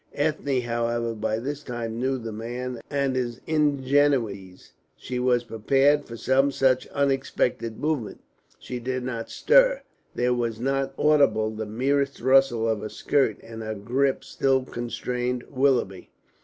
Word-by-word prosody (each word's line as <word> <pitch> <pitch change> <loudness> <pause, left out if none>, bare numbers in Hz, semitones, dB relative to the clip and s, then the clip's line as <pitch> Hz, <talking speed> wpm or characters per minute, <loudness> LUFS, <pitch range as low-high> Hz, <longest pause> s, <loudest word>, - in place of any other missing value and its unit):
Ethne, 145 -3 0
however, 120 0 -1
by 110 0 -2
this 140 +5 -4
time 120 -3 -5
knew 130 +1 0
the 115 -2 -6
man 120 +2 -5
and 140 -2 0
his 120 -1 -2
ingenuities; 140 - +1 0.2
she 125 -1 -4
was 125 -1 +2
prepared 135 +6 +2
for 115 - -8
some 135 +4 +2
such 130 -1 +2
unexpected 135 -4 -1
movement. 150 -7 -2 0.4
She 125 - -6
did 130 +1 -3
not 115 -3 -4
stir, - - +4 0.3
there 125 0 +1
was 115 -2 -2
not 135 +1 -1
audible 125 -8 +3
the 110 0 -5
merest 140 +5 0
rustle 130 -3 +3
of 110 -2 0
her 110 - -5
skirt, 135 -4 +1
and 115 0 -9
her 110 0 -4
grip 130 +7 0
still 135 -1 +1
constrained 125 0 -3
Willoughby. 130 -9 +1
125 Hz, 140 wpm, -25 LUFS, 115-135 Hz, 0.4 s, stir